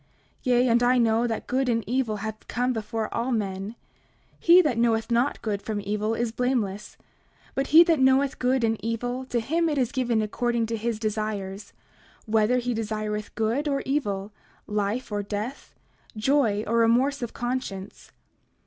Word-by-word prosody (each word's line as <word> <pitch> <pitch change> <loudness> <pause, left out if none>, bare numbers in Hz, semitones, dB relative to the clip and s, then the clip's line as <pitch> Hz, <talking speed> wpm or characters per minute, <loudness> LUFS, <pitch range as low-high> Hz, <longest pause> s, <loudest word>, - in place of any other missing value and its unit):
29:5 - - -36 0.4
Yea, 250 0 +3
and 235 0 +3
I 250 +1 +4
know 230 0 +3
that 225 -2 -3
good 260 0 0
and 230 -1 +1
evil 240 -1 0
have 215 +1 -6
come 250 +1 0
before 220 0 -3
all 240 +3 -1
men; 200 -1 -2 0.6
he 345 +2 +7
that 260 -7 0
knoweth 225 -1 +1
not 240 +4 +1
good 205 -2 -2
from 215 -1 -3
evil 210 +2 -1
is 235 -1 -1
blameless; 225 -5 -2 0.6
but 270 0 -1
he 325 +3 +8
that 330 -4 +2
knoweth 265 +1 +3
good 255 0 +1
and 225 -2 0
evil, 245 +3 -2
to 245 -2 -1
him 325 +8 0
it 295 - -1
is 250 -4 +1
given 240 -4 +1
according 235 +2 0
to 225 +1 -3
his 225 0 -2
desires, 210 -2 -3 0.5
whether 220 +3 +2
he 245 0 -1
desireth 215 -1 -3
good 235 +7 0
or 275 -1 0
evil, 210 -8 -1 0.3
life 210 +3 -2
or 205 0 -1
death, 210 +6 -5 0.4
joy 220 -3 +2
or 230 +2 0
remorse 250 +5 +3
of 240 - -5
conscience. 240 -6 -5
230 Hz, 170 wpm, -26 LUFS, 215-255 Hz, 0.6 s, he